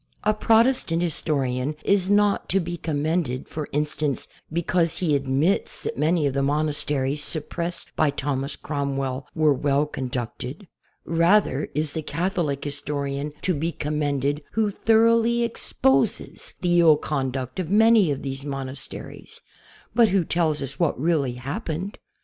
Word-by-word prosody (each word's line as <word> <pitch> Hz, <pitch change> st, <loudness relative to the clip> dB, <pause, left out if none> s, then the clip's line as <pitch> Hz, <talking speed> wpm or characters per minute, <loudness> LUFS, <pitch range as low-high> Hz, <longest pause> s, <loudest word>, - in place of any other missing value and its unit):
A 215 Hz, -, +3 dB
Protestant 220 Hz, -5 st, +3 dB
historian 140 Hz, -4 st, -1 dB
is 195 Hz, -2 st, +2 dB
not 205 Hz, 0 st, +3 dB
to 195 Hz, -, +3 dB
be 175 Hz, -1 st, -3 dB
commended, 155 Hz, -4 st, -1 dB
for 155 Hz, -2 st, -5 dB
instance, 150 Hz, -1 st, -1 dB, 0.2 s
because 170 Hz, 0 st, +1 dB
he 160 Hz, -5 st, +2 dB
admits 140 Hz, +7 st, 0 dB
that -, -, -3 dB
many 155 Hz, +2 st, +2 dB
of 140 Hz, -, +1 dB
the 140 Hz, -, 0 dB
monasteries 145 Hz, -1 st, 0 dB
.suppressed 170 Hz, +3 st, -3 dB
by 155 Hz, -, +3 dB
Thomas 140 Hz, 0 st, -2 dB
Cromwell 135 Hz, -2 st, -3 dB
were 155 Hz, -2 st, +4 dB
well 140 Hz, +2 st, +1 dB
conducted. 130 Hz, -, -5 dB, 0.4 s
Rather 170 Hz, -3 st, +3 dB
is 150 Hz, -1 st, 0 dB
the 160 Hz, -, -2 dB
Catholic 165 Hz, -4 st, -1 dB
historian 145 Hz, 0 st, -3 dB
to 185 Hz, -, +2 dB
be 160 Hz, +2 st, -1 dB
commended 145 Hz, -2 st, -1 dB
who 215 Hz, -1 st, +1 dB
thoroughly 230 Hz, +2 st, +3 dB
exposes 135 Hz, -, 0 dB
the 175 Hz, -1 st, +3 dB
ill 160 Hz, -3 st, +6 dB
conduct 130 Hz, -2 st, -3 dB
of 175 Hz, -4 st, -2 dB
many 220 Hz, -2 st, +5 dB
of 140 Hz, -2 st, -2 dB
these 135 Hz, 0 st, -4 dB
mon 135 Hz, -2 st, -4 dB
asteries, 135 Hz, +1 st, -9 dB, 0.5 s
but 235 Hz, -2 st, +5 dB
who 190 Hz, -1 st, +2 dB
tells 155 Hz, -4 st, +1 dB
us 135 Hz, 0 st, -6 dB
what 170 Hz, -7 st, +1 dB
really 145 Hz, -4 st, +1 dB
happened. 155 Hz, -, -4 dB
150 Hz, 140 wpm, -24 LUFS, 140-175 Hz, 0.5 s, ill